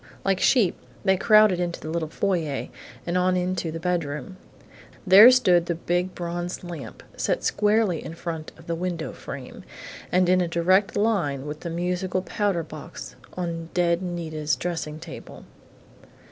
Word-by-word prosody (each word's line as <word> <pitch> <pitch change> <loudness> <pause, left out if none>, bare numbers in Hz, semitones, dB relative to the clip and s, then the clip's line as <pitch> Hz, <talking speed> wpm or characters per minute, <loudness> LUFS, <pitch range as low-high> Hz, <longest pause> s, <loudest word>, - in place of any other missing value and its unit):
Like 195 -1 +2
sheep, 220 -8 +3 0.3
they 190 -1 +5
crowded 215 -1 +5
into 175 -1 -2
the 155 - -6
little 165 -1 -1
foyer 165 -6 -1 0.4
and 175 +1 0
on 185 0 +2
into 180 -2 -1
the 165 - -5
bedroom. 170 0 -2 0.7
There 200 +5 +10
stood 180 -10 +4
the 170 - 0
big 175 +2 -1
bronze 175 +1 -4
lamp, 170 -5 -8
set - - -1
squarely 210 -4 +2
in 160 - -7
front 165 -2 -5
of 165 - -15
the 170 - -2
window 170 -1 -3
frame - - -9 0.5
and 180 0 +3
in 185 0 +4
a 175 - 0
direct 185 +5 +2
line 175 -11 0
with 150 +1 -6
the 170 - -5
musical 180 +2 -2
powder 200 -5 -1
box 155 - -9 0.2
on 165 -2 -4
dead 175 -1 +2
Nita's 160 -4 -2
dressing 165 -3 -4
table. 165 0 -10
175 Hz, 155 wpm, -25 LUFS, 165-185 Hz, 0.7 s, There